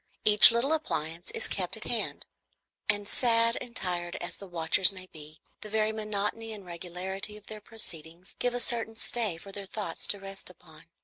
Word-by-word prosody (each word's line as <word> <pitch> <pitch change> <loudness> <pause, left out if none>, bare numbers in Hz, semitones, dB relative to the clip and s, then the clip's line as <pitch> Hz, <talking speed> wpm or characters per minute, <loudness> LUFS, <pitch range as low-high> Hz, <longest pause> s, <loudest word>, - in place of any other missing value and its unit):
Each 210 0 +9
little 235 +6 +2
appliance 170 - -2
is 460 - -1
kept - - -2
at - - -8
hand; - - -3 0.6
and 205 0 +2
sad 230 0 +3
and 245 -1 -9
tired 175 -5 -3
as 175 - -5
the 200 - -10
watchers 175 +2 +6
may 185 -1 -8
be, 155 -3 -13 0.2
the 210 - -8
very 215 0 +1
monotony 215 +1 -3
and 205 -3 -9
regularity 180 +4 -3
of 210 - -17
their 215 -1 -8
proceedings 175 -5 -5
give 245 0 0
a - - -1
certain 230 -2 +1
stay 220 -5 0
for 195 +4 -11
their 195 0 -7
thoughts 210 +1 -2
to 205 - -2
rest 195 -1 -7
upon. 160 -3 -17
200 Hz, 185 wpm, -29 LUFS, 175-225 Hz, 0.6 s, Each